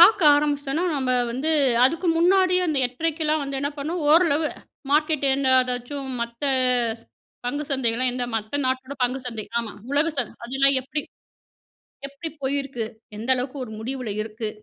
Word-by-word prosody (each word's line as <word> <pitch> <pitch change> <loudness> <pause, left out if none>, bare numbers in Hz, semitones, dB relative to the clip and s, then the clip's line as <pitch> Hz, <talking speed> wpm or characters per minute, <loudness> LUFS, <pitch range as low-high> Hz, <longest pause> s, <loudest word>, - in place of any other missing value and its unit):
பாக்க 395 +3 +8
ஆரம்பிச்சிட்டோன்னா, 290 +2 0
நம்ம 260 -2 0 0.2
வந்து, 265 +7 -1 0.3
அதுக்கு 330 +6 +1
முன்னாடியே 365 +1 +4
அந்த 305 -4 0
8:30 320 +6 -3
எல்லாம் 305 -1 +1
வந்து 275 -1 -3
என்ன 285 +1 -1
பண்ணும், 325 +5 -3
ஓரளவு 320 -2 +4 0.4
மார்க்கெட் 300 0 +2
என்ன 270 -1 0
ஏதாச்சும் 255 +2 -4
மத்த 235 +3 -4 1.0
பங்குச் 290 +3 -3
சந்தைகள் 255 -1 0
என்ன, 250 0 -2
மத்த 220 +6 -3
நாட்டோட 260 +1 -2
பங்குச் 250 +1 -1
சந்தை, 225 -3 -4 0.2
ஆமா, 225 -3 -6 0.2
உலகச் 305 +2 +1
சந்தை, 245 - -2
அதெல்லாம் 270 +2 +3
எப்பிடி 295 +3 -2 1.0
எப்பிடிப் 290 +3 -8
போயிருக்கு? 275 -3 -2 0.3
எந்த 225 +5 -4
அளவுக்கு 255 +3 -3
ஒரு 220 - -10
முடிவுல 250 0 -4
இருக்கு? 220 0 -5
275 Hz, 150 wpm, -24 LUFS, 250-305 Hz, 1.0 s, பாக்க